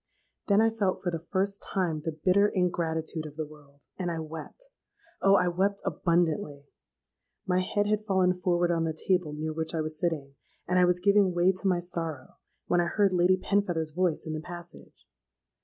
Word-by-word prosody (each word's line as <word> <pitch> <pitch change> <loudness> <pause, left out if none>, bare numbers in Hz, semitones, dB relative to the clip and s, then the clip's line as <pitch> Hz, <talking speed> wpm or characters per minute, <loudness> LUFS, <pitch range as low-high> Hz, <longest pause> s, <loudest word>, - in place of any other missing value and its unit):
Then 200 +1 +5
I 225 0 +3
felt 205 -4 -1
for 175 - 0
the 165 - -3
first 195 +4 -2
time 170 -5 -1
the 165 - -3
bitter 200 +2 +5
ingratitude 165 -4 -1
of 145 - -12
the 155 0 -3
world, 145 -2 -17 0.2
and 180 -2 -1
I 170 - -3
wept. 160 - -8 0.5
Oh! 195 0 +5
I 180 -2 +3
wept 195 +3 0
abundantly. 160 -5 0 0.8
My 180 0 +2
head 205 +3 0
had 210 0 0
fallen 190 -3 +2
forward 175 -1 +1
on 165 -1 +1
the 160 -1 -3
table 180 -5 +2
near 155 +1 -4
which 160 +1 -3
I 160 - 0
was 155 0 -4
sitting; 150 -5 -2 0.3
and 180 +1 +2
I 180 - +6
was 180 0 +2
giving 200 -2 +4
way 175 +2 +4
to 190 +1 -3
my 185 -2 +3
sorrow, 165 -5 -4 0.3
when 175 0 +2
I 170 - 0
heard 200 +1 +2
Lady 180 +1 +4
Penfeather's 180 -5 0
voice 175 0 0
in 160 - -4
the 155 - -4
passage. 175 +1 -11
175 Hz, 190 wpm, -28 LUFS, 160-190 Hz, 0.8 s, I